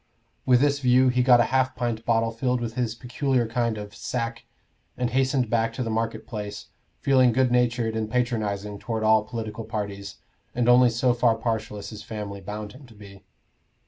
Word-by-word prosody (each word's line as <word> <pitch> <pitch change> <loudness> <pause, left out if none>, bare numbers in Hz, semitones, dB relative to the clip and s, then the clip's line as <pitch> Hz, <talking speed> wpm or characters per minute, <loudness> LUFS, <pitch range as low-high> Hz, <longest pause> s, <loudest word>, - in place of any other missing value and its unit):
With 125 -1 +5
this 145 0 +2
view 130 0 +4
he 125 0 +2
got 125 -1 +6
a - - +6
half 130 0 +2
pint 115 -2 -3
bottle 115 -1 +2
filled 125 +2 -1
with 115 -1 -4
his 115 -2 -2
peculiar 125 +1 -1
kind 115 -1 -1
of 105 -1 -8
"sack," 115 +1 -4 0.5
and 125 -1 -1
hastened 130 0 +1
back 115 0 0
to 125 - -3
the 115 - -3
market 115 +1 -2
place, 105 -3 -7 0.3
feeling 130 -3 +4
good 125 +1 +2
natured 120 -2 +1
and 110 -1 -2
patronizing 105 -4 -2
toward 110 -1 -3
all 110 0 +4
political 110 -1 -6
parties, 100 -2 -5 0.4
and 120 -1 +1
only 125 0 +6
so 120 +2 +1
far 120 -1 +3
partial 110 -2 -3
as 100 - -8
his 110 -1 -8
family 105 -2 -6
bound 105 +2 -6
him 130 +1 -14
to 115 - -17
be. 100 -2 -13
115 Hz, 190 wpm, -25 LUFS, 110-125 Hz, 0.5 s, got